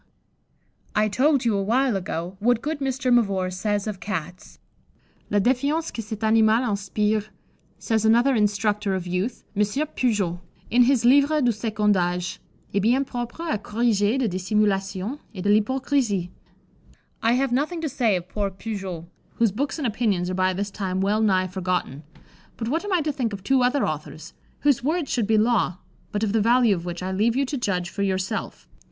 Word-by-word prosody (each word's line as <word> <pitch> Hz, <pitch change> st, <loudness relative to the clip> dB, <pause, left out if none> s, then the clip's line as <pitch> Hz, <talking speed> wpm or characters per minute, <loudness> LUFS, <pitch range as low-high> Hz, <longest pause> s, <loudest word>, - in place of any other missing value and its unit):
_ -, -, -36 dB, 0.9 s
I 215 Hz, 0 st, +3 dB
told 270 Hz, +4 st, +2 dB
you 225 Hz, -3 st, +2 dB
awhile 230 Hz, +5 st, +1 dB
ago 180 Hz, -1 st, -4 dB
what 235 Hz, +2 st, +2 dB
good 305 Hz, 0 st, -2 dB
Mr. 265 Hz, -2 st, 0 dB
Mavor 195 Hz, -6 st, +2 dB
says 205 Hz, +2 st, -1 dB
of 210 Hz, -4 st, -4 dB
Cats. 180 Hz, -3 st, -6 dB, 0.7 s
"La 205 Hz, -, +1 dB
défiance 280 Hz, +9 st, +1 dB
que 230 Hz, -, -4 dB
cet 215 Hz, 0 st, -7 dB
animal 220 Hz, +2 st, +4 dB
inspire," 210 Hz, +1 st, 0 dB, 0.5 s
says 220 Hz, -2 st, 0 dB
another 235 Hz, +5 st, +4 dB
instructor 210 Hz, -2 st, +1 dB
of 185 Hz, -1 st, -4 dB
youth, 180 Hz, +7 st, -3 dB
M. 205 Hz, -, +1 dB
Pujoulx, 210 Hz, -, 0 dB, 0.3 s
in 245 Hz, +1 st, +5 dB
his 255 Hz, -2 st, +2 dB
Livre 285 Hz, +4 st, +5 dB
du 250 Hz, -4 st, +3 dB
Second 215 Hz, -1 st, 0 dB
Age, 180 Hz, 0 st, -1 dB, 0.3 s
"est 200 Hz, -, +2 dB
bien 250 Hz, +6 st, +2 dB
propre 245 Hz, +6 st, -5 dB
à 215 Hz, -, 0 dB
corriger 215 Hz, 0 st, +1 dB
de 260 Hz, -3 st, +1 dB
dissimulation 195 Hz, +4 st, -1 dB, 0.2 s
et 185 Hz, -, -5 dB
de 205 Hz, -, +1 dB
l'hypocrisie." 215 Hz, -4 st, +1 dB, 0.9 s
I 230 Hz, +1 st, +3 dB
have 265 Hz, +1 st, +1 dB
nothing 300 Hz, +7 st, 0 dB
to 320 Hz, -, -1 dB
say 245 Hz, -7 st, +1 dB
of 180 Hz, -1 st, -4 dB
poor 200 Hz, +1 st, -2 dB
Pujoulx, 190 Hz, -4 st, -6 dB, 0.3 s
whose 230 Hz, -3 st, +2 dB
books 275 Hz, -, -2 dB
and 300 Hz, -, -3 dB
opinions 205 Hz, -6 st, 0 dB
are -, -, -2 dB
by 185 Hz, 0 st, +2 dB
this 200 Hz, +2 st, -3 dB
time 190 Hz, -2 st, -2 dB
well 205 Hz, +3 st, +1 dB
nigh 190 Hz, -4 st, +3 dB
forgotten; 180 Hz, -6 st, -2 dB, 0.6 s
but 225 Hz, -, -4 dB
what 325 Hz, +7 st, 0 dB
am 410 Hz, -, -4 dB
I 360 Hz, -3 st, +3 dB
to 305 Hz, 0 st, -1 dB
think 250 Hz, -7 st, -2 dB
of 195 Hz, -2 st, -7 dB
two 265 Hz, +5 st, +3 dB
other 250 Hz, +2 st, +2 dB
authors, 155 Hz, +1 st, -6 dB, 0.3 s
whose 285 Hz, -4 st, +2 dB
words 315 Hz, +2 st, -1 dB
should 230 Hz, -5 st, 0 dB
be 220 Hz, 0 st, +3 dB
law, 210 Hz, -5 st, +2 dB, 0.3 s
but 210 Hz, +1 st, -2 dB
of 210 Hz, -2 st, 0 dB
the 225 Hz, -, +3 dB
value 235 Hz, 0 st, +4 dB
of 175 Hz, -2 st, -4 dB
which 175 Hz, 0 st, -5 dB
I 185 Hz, -, -2 dB
leave 215 Hz, +5 st, +1 dB
you 275 Hz, +1 st, +2 dB
to 285 Hz, -, -4 dB
judge 185 Hz, -8 st, -2 dB
for 200 Hz, -, -4 dB
yourself. 190 Hz, +2 st, -2 dB
215 Hz, 185 wpm, -24 LUFS, 195-250 Hz, 0.9 s, in